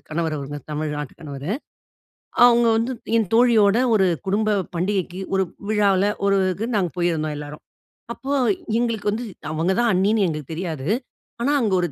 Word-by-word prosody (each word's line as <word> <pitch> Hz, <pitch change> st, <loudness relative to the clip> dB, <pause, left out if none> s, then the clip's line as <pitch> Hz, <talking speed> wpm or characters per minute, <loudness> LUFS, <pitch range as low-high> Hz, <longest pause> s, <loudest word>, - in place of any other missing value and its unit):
கணவர், 160 Hz, 0 st, -1 dB
அவுங்க 145 Hz, +1 st, -6 dB
தமிழ்நாட்டு 150 Hz, -2 st, -3 dB
கணவரு. 145 Hz, +1 st, -6 dB, 1.0 s
அவுங்க 240 Hz, -1 st, +5 dB
வந்து, 235 Hz, +3 st, 0 dB, 0.3 s
என் 220 Hz, -4 st, +1 dB
தோழியோட 225 Hz, -3 st, +5 dB, 0.2 s
ஒரு 190 Hz, -2 st, +4 dB, 0.2 s
குடும்ப 215 Hz, +2 st, +1 dB, 0.3 s
பண்டிகைக்கு, 185 Hz, 0 st, -1 dB, 0.2 s
ஒரு 190 Hz, -, +3 dB, 0.3 s
விழாவுல 200 Hz, -2 st, +3 dB, 0.2 s
ஒரு 195 Hz, 0 st, +3 dB, 0.2 s
க்கு 220 Hz, -, -3 dB
நாங்க 180 Hz, -5 st, 0 dB
போயிருந்தோம், 160 Hz, -3 st, 0 dB
எல்லோரும். 150 Hz, 0 st, -8 dB, 0.5 s
அப்போ 275 Hz, +1 st, -5 dB, 0.5 s
எங்களுக்கு 225 Hz, -3 st, 0 dB
வந்து 230 Hz, +4 st, -3 dB, 0.3 s
அவங்க 165 Hz, +4 st, +1 dB
தான் 235 Hz, -2 st, +3 dB
அண்ணின்னு 200 Hz, +3 st, +2 dB
எங்களுக்கு 155 Hz, -2 st, -4 dB
தெரியாது. 160 Hz, -5 st, -4 dB, 0.6 s
ஆனா 285 Hz, +4 st, +2 dB
அங்க 215 Hz, -4 st, 0 dB
ஒரு 175 Hz, -, 0 dB
190 Hz, 145 wpm, -22 LUFS, 155-215 Hz, 1.0 s, அவுங்க